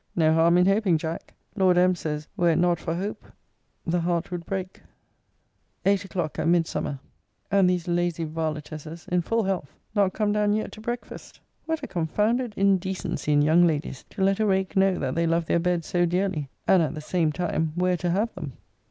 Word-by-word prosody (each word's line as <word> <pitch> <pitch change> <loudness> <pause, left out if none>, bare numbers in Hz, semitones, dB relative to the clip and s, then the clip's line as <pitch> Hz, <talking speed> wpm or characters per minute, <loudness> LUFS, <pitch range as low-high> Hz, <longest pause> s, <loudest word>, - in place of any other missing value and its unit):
No 160 -2 +4
harm 165 +2 +4
in 180 - +5
hoping, 195 -3 +3
Jack! 160 +1 -6 0.2
Lord 185 -3 +3
M. 180 +1 +5
says, 150 -3 -4
were 175 -1 +2
it 165 - +3
not 175 0 +2
for 165 - -3
hope, 200 +4 -4 0.6
the 175 +1 +1
heart 170 0 -1
would 175 -1 -5
break. 190 -1 -4 1.0
Eight 200 0 +3
o'clock 175 -6 -4
at 160 - 0
Midsummer, 165 -4 0 0.5
and 195 -2 +4
these 180 -1 -1
lazy 175 -1 0
varletesses 155 0 -5
(in 180 0 +2
full 225 +6 0
health) 190 -8 -3 0.2
not 200 -3 +2
come 210 -1 0
down 210 0 +2
yet 215 +1 -2
to 215 - -11
breakfast! 240 +2 -6 0.3
What 320 -2 -2
a - - -3
confounded 210 +7 0
indecency 190 -5 0
in 145 0 +4
young 170 +3 +5
ladies, 150 -4 -3
to 190 - -3
let 195 +1 +2
a 220 - +2
rake 190 0 0
know 190 -1 +3
that 130 -2 -2
they 170 +1 +1
love 165 0 +1
their 170 - +2
beds 175 -1 0
so 175 -1 +1
dearly, 175 -5 -1 0.2
and, 190 - +5
at 155 -2 -1
the 155 - -6
same 160 0 0
time, 160 -1 -1
where 180 0 +1
to 175 +1 -2
have 210 +6 0
them! 155 -8 -7
175 Hz, 195 wpm, -25 LUFS, 160-195 Hz, 1.0 s, in